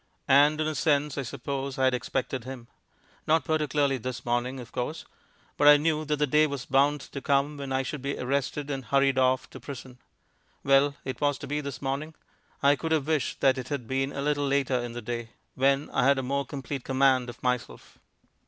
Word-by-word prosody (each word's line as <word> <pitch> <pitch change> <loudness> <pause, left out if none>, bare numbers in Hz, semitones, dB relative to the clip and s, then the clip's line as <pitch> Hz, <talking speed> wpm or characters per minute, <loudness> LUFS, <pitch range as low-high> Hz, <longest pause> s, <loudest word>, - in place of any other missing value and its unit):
And 145 +3 +5
in 155 - +1
a 155 - -1
sense, 145 -1 +1
I - - 0
suppose, 135 +2 -4
I 130 - 0
had 130 -1 +4
expected 125 +1 -2
him. 130 -2 -8 0.6
Not 160 -2 +3
particularly 145 -3 +1
this 125 +1 -5
morning, 120 +2 -1
of 120 - -10
course; 140 +6 -4 0.5
but 145 - +4
I 145 0 +10
knew 155 +1 0
that 150 0 0
the 150 0 +1
day 150 +2 +4
was 140 -3 -5
bound 140 +2 +2
to 140 - -8
come 140 +2 +1
when 140 -1 -6
I 130 0 +1
should 145 +1 -5
be 140 +1 -3
arrested 140 +2 -2
and 135 -2 -4
hurried 135 +1 +2
off 130 0 +2
to - - -9
prison. 130 -2 -9 0.6
Well, 140 +1 +4
it 130 0 -5
was 145 -1 +2
to - - -8
be 150 +1 -2
this 140 0 -7
morning. 140 +4 -3 0.5
I 140 +1 +6
could 160 +4 -4
have 150 -4 +1
wished 155 -5 -1
that 135 -1 +4
it 125 - -6
had 140 -4 -3
been 135 +2 -1
a 140 - -4
little 145 -1 0
later 135 -2 +1
in 120 -1 -5
the 120 -1 -6
day, 115 0 -5 0.2
when 135 +2 +2
I - - +1
had 140 0 +4
more 140 +1 -1
complete 140 -1 -5
command 130 -2 +2
of 120 - -11
myself. 125 -2 -3
140 Hz, 210 wpm, -27 LUFS, 130-145 Hz, 0.6 s, I